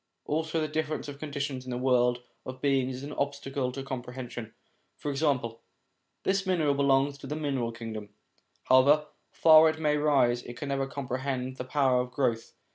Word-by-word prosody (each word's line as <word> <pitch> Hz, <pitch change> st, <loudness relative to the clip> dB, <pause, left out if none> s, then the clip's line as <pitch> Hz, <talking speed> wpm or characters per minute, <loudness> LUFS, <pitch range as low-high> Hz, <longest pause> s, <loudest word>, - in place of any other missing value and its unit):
Also 160 Hz, +1 st, -1 dB
the 155 Hz, -, 0 dB
difference 155 Hz, 0 st, -2 dB
of 140 Hz, -1 st, -8 dB
conditions 140 Hz, -3 st, -4 dB
in 130 Hz, -, -9 dB
the 125 Hz, -, -2 dB
world 125 Hz, -1 st, +2 dB, 0.2 s
of 130 Hz, 0 st, -7 dB
beings 135 Hz, -2 st, +1 dB
is 130 Hz, -, -8 dB
an 145 Hz, +1 st, -6 dB
obstacle 140 Hz, -2 st, -2 dB
to 135 Hz, +1 st, -6 dB
comprehension. 125 Hz, -3 st, -6 dB, 0.5 s
For 145 Hz, -, -3 dB
example: 135 Hz, -6 st, 0 dB, 0.6 s
this 195 Hz, +1 st, +1 dB
mineral 170 Hz, -6 st, +2 dB
belongs 140 Hz, 0 st, +2 dB
to 135 Hz, -, -9 dB
the 150 Hz, -, -3 dB
mineral 135 Hz, -6 st, -1 dB
kingdom; 110 Hz, -2 st, -7 dB, 0.5 s
however 140 Hz, +4 st, +5 dB, 0.3 s
far 160 Hz, 0 st, +7 dB
it 160 Hz, 0 st, -4 dB
may 150 Hz, -1 st, +2 dB
rise, 135 Hz, -5 st, +3 dB
it 120 Hz, 0 st, -9 dB
can 140 Hz, -, -5 dB
never 135 Hz, -1 st, 0 dB
comprehend 130 Hz, -1 st, -3 dB
the 125 Hz, -, -5 dB
power 130 Hz, -2 st, +2 dB
of 125 Hz, -, -5 dB
growth. 125 Hz, -3 st, -1 dB
135 Hz, 175 wpm, -29 LUFS, 125-145 Hz, 0.6 s, far